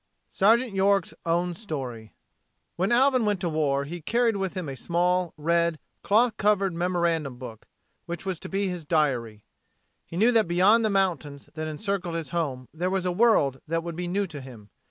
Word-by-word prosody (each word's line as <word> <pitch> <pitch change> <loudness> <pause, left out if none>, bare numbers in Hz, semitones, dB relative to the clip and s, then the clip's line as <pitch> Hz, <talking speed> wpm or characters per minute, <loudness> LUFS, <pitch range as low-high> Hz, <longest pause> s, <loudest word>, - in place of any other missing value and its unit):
VI - - -32 0.2
Sergeant 240 -3 -5
York's 195 -1 +2
Own 175 +1 +1
Story 130 - -6 0.6
When 185 +5 0
Alvin 255 0 +4
went 205 -3 0
to 175 - 0
war 145 -3 0
he 170 +5 -7
carried 230 +6 +1
with 195 -1 -3
him 185 -4 -4
a 135 - -5
small, 175 +3 0
red, 170 +1 +1 0.2
cloth 225 +2 +2
covered 200 -3 +2
memorandum 170 -6 -1
book, 115 -4 -10 0.4
which 170 +2 -6
was 185 -3 -3
to - - -8
be 195 +1 -1
his 180 -3 -4
diary. 130 -9 0 0.6
He 170 - -7
knew 225 +6 +4
that 225 -5 +3
beyond 190 +7 +4
the 220 - +2
mountains 175 -8 -1
that 155 0 -4
encircled 175 +1 -3
his 165 -2 -4
home 140 -7 -3
there 175 +3 -1
was 190 -1 -1
a 180 - +1
world 175 - +3
that 165 +1 -1
would 170 -1 -5
be 175 +1 -4
new 200 +3 0
to 155 -6 -8
him. 115 -6 -13
175 Hz, 190 wpm, -26 LUFS, 155-195 Hz, 0.6 s, Alvin